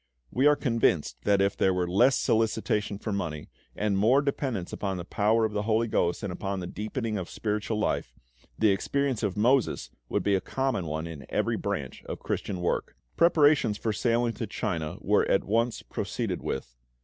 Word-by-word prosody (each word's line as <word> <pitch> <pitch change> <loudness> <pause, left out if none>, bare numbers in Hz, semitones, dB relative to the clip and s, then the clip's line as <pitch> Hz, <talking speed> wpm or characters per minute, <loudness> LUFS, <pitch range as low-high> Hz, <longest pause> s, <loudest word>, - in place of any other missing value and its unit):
We 135 +3 +3
are 150 - +6
convinced 115 - +1
that 100 -1 +4
if 100 0 +1
there 95 -1 +2
were 90 -1 0
less 120 +9 +4
solicitation 110 -2 +1
for 105 0 -4
money 80 -6 -4 0.2
and 100 -2 0
more 125 +8 +4
dependence 130 -9 -2
upon 95 -2 -2
the 85 - -6
power 110 +4 +2
of 110 - -3
the 105 - 0
HOLY 110 +2 +2
GHOST 90 -4 0
and 100 -3 -3
upon 95 +1 -3
the 90 - -4
deepening 110 +3 -3
of 90 - -6
spiritual 105 0 -2
life, 105 - -1 0.4
the 110 -2 +4
experience 135 +5 0
of 105 -3 -1
Moses 125 +3 +2 0.2
would - - 0
be 100 - +2
a 95 - +2
common 135 -10 -1
one 80 +1 -3
in 80 -5 -8
every - - 0
branch - - -4
of - - -5
Christian 95 -3 -3
work. 85 - -1 0.2
Preparations 145 -10 +4
for 110 0 -1
sailing 120 +2 +1
to 115 - -4
China 80 -5 -3
were - - +2
at - - +3
once 115 +3 0
proceeded - - -3
with. - - -4
105 Hz, 185 wpm, -28 LUFS, 95-115 Hz, 0.4 s, are